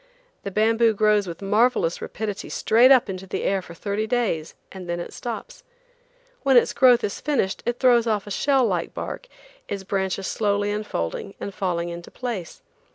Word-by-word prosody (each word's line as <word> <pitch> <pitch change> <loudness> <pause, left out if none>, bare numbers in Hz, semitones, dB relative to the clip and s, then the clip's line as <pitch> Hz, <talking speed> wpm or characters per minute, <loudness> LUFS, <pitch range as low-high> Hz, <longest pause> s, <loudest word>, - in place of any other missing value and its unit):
The - - -5
bamboo 225 +2 +3
grows 210 -1 +3
with 170 +3 -7
marvelous 210 -4 +2
rapidity 205 -2 -5
straight 235 +4 +4
up 255 -4 +6
into 190 -1 -6
the - - -3
air 195 -1 +1
for 170 -2 -12
thirty 205 +4 -2
days, 215 -10 -1 0.2
and 185 -2 -9
then 175 0 -2
it 175 - -7
stops. 375 - -7 0.8
When 265 -2 +4
its 240 - +4
growth 250 -2 +5
is 200 - -3
finished 265 -10 0
it 240 0 0
throws 240 -3 +4
off 210 -3 0
a 205 - -9
shell 270 +4 +2
like 180 -6 -2
bark, - - -6 0.4
its 200 -1 -4
branches 190 0 -2
slowly 205 0 0
unfolding 200 - -4
and 200 - -5
falling 175 -3 -2
into 170 0 -8
place. 230 -9 -6
205 Hz, 175 wpm, -24 LUFS, 190-235 Hz, 0.8 s, up